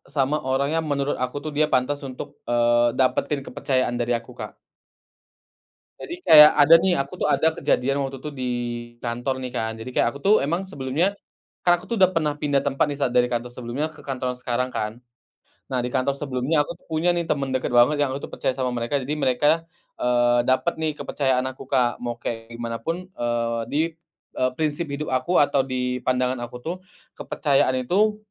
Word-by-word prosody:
sama 140 +2 +2
orang 135 +2 +1
yang 160 - -3
menurut 140 0 0
aku 125 +1 -3
tuh 155 - -4
dia 155 - +4
pantas 135 +3 +1
untuk, 130 - -7 0.2
eee, 120 0 +3
dapetin 135 +2 +1
kepercayaan 130 -2 -1
dari 120 0 0
aku, 115 - -15
Kak. - - -8 1.4
Jadi 350 +1 -8
kayak 150 -1 +10
ada 145 +2 +6
nih, 185 0 +2
aku 140 -2 -2
tuh - - +1
ada 160 +4 +3
kejadian 135 -2 0
waktu 135 -1 -4
itu 150 - -5
di 130 -2 -5 0.6
kantor 120 +3 -2
nih, 125 - -4
kan, 110 -3 -2
jadi 110 +3 -7
kayak - - +2
aku - - -8
tuh 200 - +5
emang 170 +7 -1
sebelumnya, 150 +1 -1 0.5
kan 175 - +3
aku - - -13
tuh 235 - -2
udah 185 - +6
pernah 155 -5 0
pindah 145 -1 0
tempat 135 -1 +1
nih 140 - -5
saat 130 -4 0
dari 125 0 +3
kantor 120 0 -2
sebelumnya 125 +5 -3
ke - - -14
kantor 130 -2 -3
sekarang 125 +1 -2
kan. 110 +1 -3 0.7
Nah, 125 -2 -1
di 125 - -3
kantor 135 +1 0
sebelumnya 140 +2 0
aku 170 - -6
tuh - - -28
punya 160 +3 +1
nih, 170 -1 -2
temen 140 -3 -1
deket 130 0 -1
banget 145 +5 +5
yang 145 - +2
aku 140 - -7
percaya 130 - -2
sama 130 -1 -1
mereka, 120 +3 -1
jadi 140 +2 -2
mereka, 150 +6 +2 0.3
eee, 120 0 +3
dapet 130 +6 +2
nih 155 -1 +1
kepercayaan 130 -3 0
aku, 130 0 -7
Kak, 125 -3 +1
mau 120 -1 -3
kayak 115 0 -6
gimanapun, 120 +10 -4
eee, 115 -2 -1
di, 145 - -1 0.5
eee, 130 0 0
prinsip 155 +1 -1
hidup 140 0 -4
aku 150 +8 +1
atau 145 -1 +4
di 125 -1 -2
pandangan 125 0 0
aku 120 0 -6
tuh, 170 +2 -2 0.5
kepercayaan 130 -3 +1
itu, 210 +8 +2
130 Hz, 195 wpm, -23 LUFS, 125-150 Hz, 1.4 s, kayak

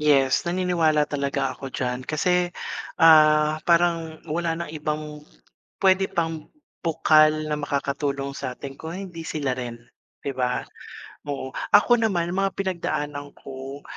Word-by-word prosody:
Yes, 140 -2 +3
naniniwala 170 -4 +1
talaga 140 -2 -1
ako 135 -2 -8
diyan 125 0 -2
kasi, 175 +4 +1 0.5
ah, 155 -1 +6
parang 170 -2 +2
wala 165 +2 -1
ng 170 -1 -5
ibang 150 0 -4 0.6
pwede 190 0 +4
pang 165 -3 -3 0.3
bukal 155 -1 +4
na 150 - 0
makakatulong 140 -1 -2
sa 130 -2 -4
atin 135 +2 -9
kung 160 +3 -7
hindi 175 -3 -7
sila 140 -5 -2
rin, 120 -2 -6 0.4
'diba? 125 -2 -2 0.6
Oo 140 -2 -4 0.2
ako 240 +3 +5
naman 175 -3 -1
mga 195 +2 +1
pinagdaanan 150 -6 -3
ko, 135 +1 -9
155 Hz, 125 wpm, -24 LUFS, 140-170 Hz, 0.6 s, ah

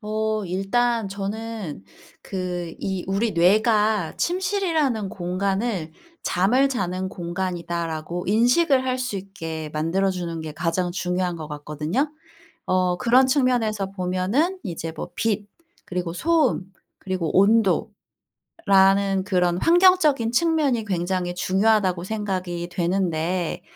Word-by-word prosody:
어 215 0 -1
일단 220 +4 0
저는 200 - -5 0.4
그 180 -3 -4
이 190 -2 -3
우리 200 +4 0
뇌가 210 +1 +3
침실이라는 340 - 0
공간을 190 0 -2 0.3
'잠을 245 +10 +2
자는 185 -7 -2
공간이다.'라고 170 -2 -4
인식을 255 - +3
할 255 0 -1
수 250 -5 -3
있게 165 -5 -6
만들어 165 +6 +1
주는 170 -3 -4
게 160 -1 -6
가장 175 +3 -1
중요한 180 0 -1
것 155 -2 -6
같거든요. 150 - -2 0.6
어 185 -1 +1
그런 250 +5 +4
측면에서 240 -7 +1
보면은 195 - 0
이제 165 -5 -5
뭐 - - -6
빛 210 -2 -1 0.4
그리고 175 -2 -3
소음 290 - +1 0.3
그리고 185 -4 -2 1.1
온도라는 195 - +3
그런 180 -3 +1
환경적인 330 -9 +4
측면이 285 -5 +2
굉장히 180 -2 -1
중요하다고 190 -1 +2
생각이 185 -4 -3
되는데 175 -1 -1
195 Hz, 255 characters per minute, -23 LUFS, 175-230 Hz, 1.1 s, 그런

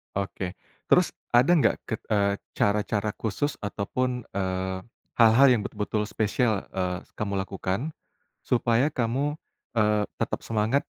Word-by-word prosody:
Oke. 95 -2 -3 0.3
Terus - - +4 0.2
ada 125 +7 +6
nggak 170 -4 +4
ke 110 - -3
eee, 100 -2 +1 0.2
cara-cara 105 0 +1
khusus 140 +7 -2
ataupun, 125 +5 -2
eee, 95 -1 -2 0.4
hal-hal 115 +4 +7
yang 120 -4 +3
betul-betul 105 0 -2
spesial, 110 0 0
eee, 90 -1 -2 0.2
kamu 100 -2 -1
lakukan, 95 +9 -3 0.5
supaya 120 +3 +2
kamu, 135 +4 -1 0.4
eee, 105 -1 +3 0.2
tetap - - -2
semangat 115 +5 +1
105 Hz, 120 wpm, -26 LUFS, 100-125 Hz, 0.5 s, hal-hal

